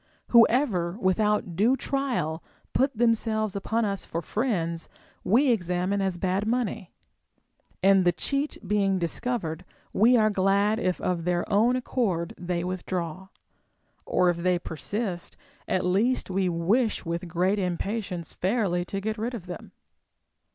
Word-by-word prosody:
Whoever 225 -7 +4
without 200 -2 +1
due 230 +9 +3
trial 245 - -2 0.3
put 265 -2 +1
them 235 0 +4
selves 215 -2 -2
upon 220 +3 0
us 200 -1 -2
for 165 - -4
friends 170 -4 -2 0.3
Ave 245 +9 +3
examine 180 -1 0
as 190 -2 -1
bad 190 +3 -1
money; 230 -6 -1 0.9
and 195 -1 +5
the 175 - +4
cheat 275 - -2
being 195 -1 +2
discovered, 175 -1 -2 0.3
we 240 +5 +5
are 215 -1 +3
glad 200 +2 +2
if 185 -4 0
of 175 -2 -1
their 175 0 0
own 230 +5 +4
accord 210 -9 -1
they 175 -1 -3
Avithdraw; 185 0 -4 0.7
or 180 -1 +2
if 170 - -5
they 180 +1 +1
persist, 175 - -4 0.3
at 185 -1 0
least 200 +5 +1
we 185 0 +1
wish 200 +8 +1
Λvith 170 +1 -3
great 185 +4 +1
impatience 185 -1 -3
fairly 190 -3 0
to 195 +2 -4
get 215 +1 -3
rid 240 +3 -2
of 195 -7 -8
them. 180 -1 -8
195 Hz, 140 wpm, -26 LUFS, 175-225 Hz, 0.9 s, and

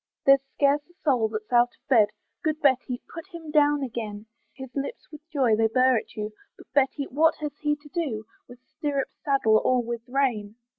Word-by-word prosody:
There's 275 0 +7
scarce 285 +1 +3
a 350 - -24
soul 250 -7 +3
that's 215 +1 -6
out 240 0 +4
of - - -53
bed; 230 -6 +5 0.4
Good 310 -2 0
Betty! 260 -3 +1
put 330 +3 -8
him 335 -5 -9
down 295 -1 +3
again; 220 -4 -5 0.3
His 265 -2 -10
lips 280 - -5
with 300 - -11
joy 260 -7 +3
they 225 +1 +3
burr 255 +3 +4
at - - -14
you, 215 0 -4 0.2
But, - - -17
Betty! 280 +1 +2
what 315 +5 +3
has 300 -1 -5
he 295 -1 +1
to 295 0 -17
do 275 -11 -3 0.2
With 245 0 -13
stirrup, 280 0 -3
saddle, 250 -7 +3
or 250 -1 +2
with 235 0 -4
rein? 240 -6 0
265 Hz, 195 wpm, -26 LUFS, 230-295 Hz, 0.4 s, There's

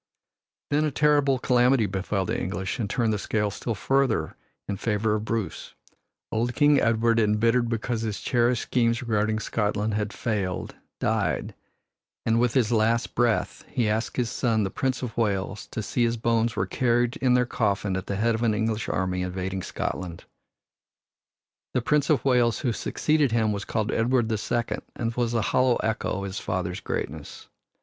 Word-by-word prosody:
Then 150 +1 +3
a 155 - +2
terrible 145 -1 +3
calamity 125 -1 +3
befell 95 0 -2
the - - -1
English 95 +5 -3
and 105 -4 -2
turned 115 -2 +1
the 105 - -1
scale 105 0 -1
still 115 +3 -3
further 135 - +1 0.3
in 100 - -2
favor 105 +1 0
of 105 0 -2
Bruce. 110 -3 -3 0.6
Old 120 +2 -1
King 145 -1 +5
Edward, 115 0 +3
embittered 115 +3 +2
because 115 0 -2
his 110 -2 -3
cherished 120 -1 +1
schemes 120 0 +1
regarding 110 -2 +1
Scotland 105 -1 -1
had 105 0 -1
failed, 100 -7 -2 0.3
died, 100 - 0 0.7
and 115 +1 +3
with 125 0 +1
his 120 -4 +3
last 115 +1 +2
breath 120 -2 0
he 120 -3 0
asked 110 +2 -1
his 120 -3 0
son, 115 -4 +1
the 95 - -2
Prince 130 +3 -1
of 115 -2 -4
Wales, 100 -2 -1
to 110 - -5
see 120 +4 0
his 115 0 +1
bones 115 0 +1
were 95 - 0
carried 120 +4 +1
in 125 -2 +3
their 125 0 +3
coffin 100 -4 0
at 95 +1 -4
the 100 - -2
head 115 +3 +2
of 110 - -2
the 120 - +2
English 110 0 -1
army 95 -1 -1
invading 95 +1 -3
Scotland. 90 -1 -4 1.5
The 125 - +3
Prince 150 +2 +2
of 150 -3 +2
Wales 120 -3 +3
who 125 -6 0
succeeded 150 +3 +1
him 110 -2 +2
was 100 -1 -3
called 110 -1 -1
Edward 120 0 +1
the 110 - 0
Second 120 +2 -2
and 115 0 -2
was 120 -1 -1
a 115 - +2
hollow 130 -1 +4
echo 110 -3 -1
of 100 - -4
his 100 0 -4
father's 90 -1 -3
greatness. 75 +1 -5
115 Hz, 175 wpm, -26 LUFS, 105-120 Hz, 1.5 s, King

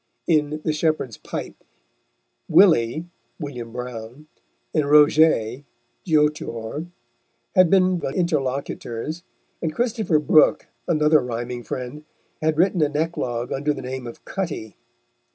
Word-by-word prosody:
In 155 -2 +1
the 155 - +1
Shepherd's 150 -7 -1
Pipe - - -7 0.9
Willy 160 - +4 0.3
(William 125 -7 -6
Browne) 125 +3 -7 0.5
and 150 -3 +1
Roget 145 -5 +4 0.4
(Geo 155 -4 +4
t 150 0 -7
r) 115 +7 -5 0.7
had 185 -3 +5
been 185 -1 +3
the - - -3
interlocutors, 140 -2 -2 0.4
and 160 -2 -2
Christopher 225 -8 +1
Brooke, 150 0 +4 0.2
another 155 -2 +4
rhyming 120 0 -4
friend, 125 +5 -6 0.4
had 155 0 +1
written 180 0 +3
an 150 -1 +1
eclogue 125 -7 -2
under 145 +2 0
the - - -7
name 130 -1 -5
of 115 - -11
Cutty. 155 - -4
150 Hz, 120 wpm, -23 LUFS, 125-160 Hz, 0.9 s, had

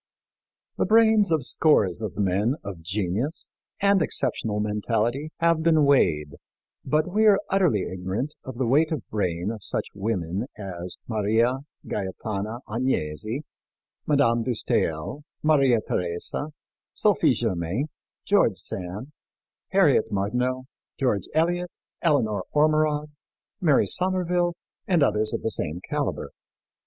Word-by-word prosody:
The - - +3
brains 220 -2 +5
of 155 -5 +1
scores 110 - +2
of 105 -3 -5
men 100 +5 +1
of 95 -5 -7
genius 100 - -2 0.3
and 200 -2 +4
exceptional 115 -8 -1
mentality 115 +6 -1
have 165 -1 +3
been 160 -2 +4
weighed, 75 - +2 0.5
but 155 +2 +1
we 215 +4 +3
are 205 -2 +7
utterly 180 - +3
ignorant 95 +10 -3
of 130 -2 -8
the 130 - 0
weight 150 +7 +3
of 150 -7 -3
brain 90 -2 -1
of 110 -3 -8
such - - -2
women 100 0 -2
as 90 -3 -7
Maria 115 +4 +1 0.3
Gaetana 105 +4 -4
Agnesi, 110 - -2 0.7
Madame 135 -6 +3
de 125 +2 -1
Staël, 85 - -1 0.2
Maria 140 -6 +4
Theresa, 85 - -2 0.5
Sophie 170 -9 +3
Germain, 95 - -1 0.4
George 155 - +3
Sand, 95 +9 -6 0.6
Harriet 160 - +3
Martineau, 125 +6 -1 0.4
George 120 -9 0
Eliot, 175 +2 +1 0.3
Eleanor 110 - +1
Ormerod, 150 0 +2 0.5
Mary 155 -6 +4
Somerville, 180 -1 +1 0.3
and 175 -7 +3
others 105 -3 +1
of - - -3
the 110 - 0
same 85 -4 0
caliber. - - -2
120 Hz, 120 wpm, -25 LUFS, 100-155 Hz, 0.7 s, are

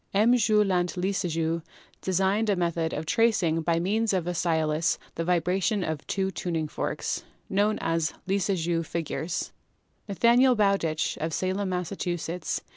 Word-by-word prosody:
M. 225 +5 +5
Jul. 210 -4 +3
Ant. 175 0 0
Lissajous 170 -3 -1 0.4
designed 195 +4 +1
a 200 - +3
method 170 -2 0
of 155 - -4
tracing 175 -5 +2
by 165 +1 +1
means 210 +5 +1
of 180 -3 0
a 175 - -1
stylus 160 -1 +1 0.2
the 165 - -3
vibrations 180 +3 +1
of 155 -2 -4
two 190 -1 -1
tuning 165 -4 -2
forks, - - -3 0.3
known 205 +2 +2
as 165 -1 0 0.2
'Lissajous' 180 -4 0
figures/ 165 0 -3 0.6
Nathaniel 240 +6 +4
Bowditch, 195 -7 +1
of 160 +1 -2
Salem, 190 +3 -1
Mass. 180 0 -2
180 Hz, 135 wpm, -27 LUFS, 165-200 Hz, 0.6 s, M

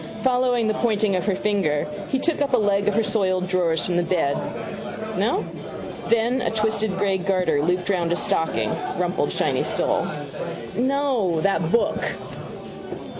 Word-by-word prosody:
Following 250 -3 +2
the 215 - +2
pointing 215 -3 +1
of 180 - -1
her 200 - +2
finger 190 -8 0 0.2
he 265 - +1
took 305 +2 0
up 280 -2 0
a - - +3
leg 205 -2 +2
of 210 - +2
her 225 - +3
soiled 190 -3 +1
drawers 175 -4 +1
from 175 -1 0
the - - +4
bed. 170 -5 +1 0.8
No? - - +1 0.6
Then, 235 +3 +2
a - - +1
twisted 220 -2 0
grey 195 -1 +1
garter 180 -6 +1
looped 180 +3 0
round 175 -4 +1
a - - +3
stocking: 160 -1 0 0.3
rumpled, - - 0
shiny - - +1
sole. - - +1 0.7
—No: 255 - +1
that 175 -3 +1
book. 235 - +2
200 Hz, 155 wpm, -23 LUFS, 180-230 Hz, 0.8 s, the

